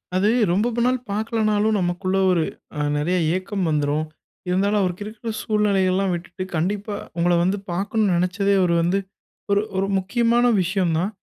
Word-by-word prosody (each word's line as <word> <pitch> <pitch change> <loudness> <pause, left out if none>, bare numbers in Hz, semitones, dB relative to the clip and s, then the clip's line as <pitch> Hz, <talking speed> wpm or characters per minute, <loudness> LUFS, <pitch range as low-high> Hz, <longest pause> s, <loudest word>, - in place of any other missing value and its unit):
அது 200 +3 +3 0.2
ரொம்ப 205 +6 +2 0.2
நாள் 255 +1 +2
பார்க்கலனாலும் 215 0 +1
நமக்குள்ள 185 +2 -1
ஒரு 170 -3 +2 0.3
அ - - -2 0.2
நெறைய 170 +5 0 0.2
ஏக்கம் 190 0 -2
வந்துரும். 150 0 0 0.4
இருந்தாலும் 200 +3 +2
அவருக்கு 185 +2 -2
இருக்கிற 225 +1 -6
சூழ்நிலைல்லா 195 -3 +1
விட்டுட்டு 180 +2 -5
கண்டிப்பா, 205 +5 -2 0.2
உங்கள 175 +1 +2
வந்து 190 +3 +1
பார்க்கணும்னு 200 +2 0
நெனச்சதே 190 +3 +1
அவரு 175 -2 +2
வந்து 180 +4 +1 0.5
ஒரு 200 - +4 0.2
ஒரு 195 +1 +1
முக்கியமான 235 +5 +2 0.2
விஷயம் 180 -2 0
தான் 190 +4 -1
195 Hz, 145 wpm, -22 LUFS, 180-210 Hz, 0.5 s, ஒரு